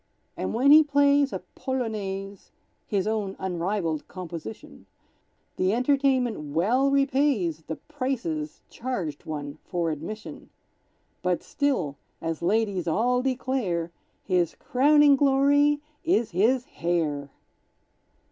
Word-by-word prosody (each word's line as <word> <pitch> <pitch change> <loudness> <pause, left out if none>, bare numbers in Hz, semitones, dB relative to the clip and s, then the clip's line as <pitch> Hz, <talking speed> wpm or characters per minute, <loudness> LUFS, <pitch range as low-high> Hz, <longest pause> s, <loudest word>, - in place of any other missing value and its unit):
And - - -3
when 265 +5 +5
he 310 +1 +10
plays 285 -1 +3
a - - -5
"Polonaise," 200 -7 -4 0.4
(His 195 -3 0
own 210 -3 -2
unrivalled 175 -3 -2
composition), 180 +2 -9 0.7
The 185 +2 +2
entertainment 250 - +1
well 245 +11 +3
repays 275 - +1
The 160 - -3
prices 235 - -4
charged 190 - -4
one 145 -1 -5
for 170 -3 -1
admission; 165 +9 -7 0.7
But - - 0
still, 245 - -1 0.2
as 165 -1 -3
ladies 200 -2 0
all 245 +9 +2
declare, 250 -10 -1 0.3
His 180 -4 +1
crowning 290 +2 +4
glory 285 +1 +3 0.2
is 240 -9 +1
his 235 +8 +2
hair! 165 - -2
215 Hz, 105 wpm, -26 LUFS, 170-270 Hz, 0.7 s, he